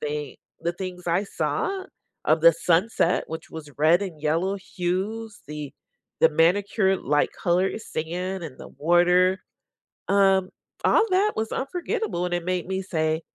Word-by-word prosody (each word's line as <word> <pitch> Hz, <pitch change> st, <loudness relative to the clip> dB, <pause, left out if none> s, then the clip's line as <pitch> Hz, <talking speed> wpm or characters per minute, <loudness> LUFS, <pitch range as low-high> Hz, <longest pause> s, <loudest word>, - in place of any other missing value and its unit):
think 150 Hz, -2 st, -4 dB, 0.2 s
the 170 Hz, -, -1 dB
things 180 Hz, 0 st, -7 dB
I 180 Hz, +5 st, +2 dB
saw 380 Hz, -, -2 dB, 0.4 s
of 155 Hz, +1 st, +3 dB
the 170 Hz, 0 st, +9 dB
sunset, 175 Hz, +3 st, +1 dB
which 160 Hz, +1 st, -7 dB
was 155 Hz, -2 st, -8 dB
red 165 Hz, +5 st, +4 dB
and 170 Hz, -6 st, -6 dB
yellow 170 Hz, +6 st, +1 dB
hues, 200 Hz, +4 st, -3 dB
the 150 Hz, -2 st, -6 dB, 0.5 s
the -, -, +7 dB
manicure-like 185 Hz, -, +2 dB
color 180 Hz, +4 st, 0 dB
sand 180 Hz, 0 st, -4 dB
and 140 Hz, -5 st, -9 dB
the -, -, -8 dB
water, 180 Hz, +3 st, +3 dB, 0.7 s
um, 195 Hz, -1 st, +4 dB, 0.4 s
all 460 Hz, -, +5 dB
that 400 Hz, +3 st, +3 dB
was 220 Hz, 0 st, -2 dB
unforgettable 275 Hz, -, -2 dB
and 180 Hz, -, -2 dB
it 175 Hz, -, -3 dB
made 180 Hz, -1 st, -1 dB
me 190 Hz, 0 st, -2 dB
say, 160 Hz, -2 st, -1 dB
180 Hz, 145 wpm, -25 LUFS, 165-195 Hz, 0.7 s, the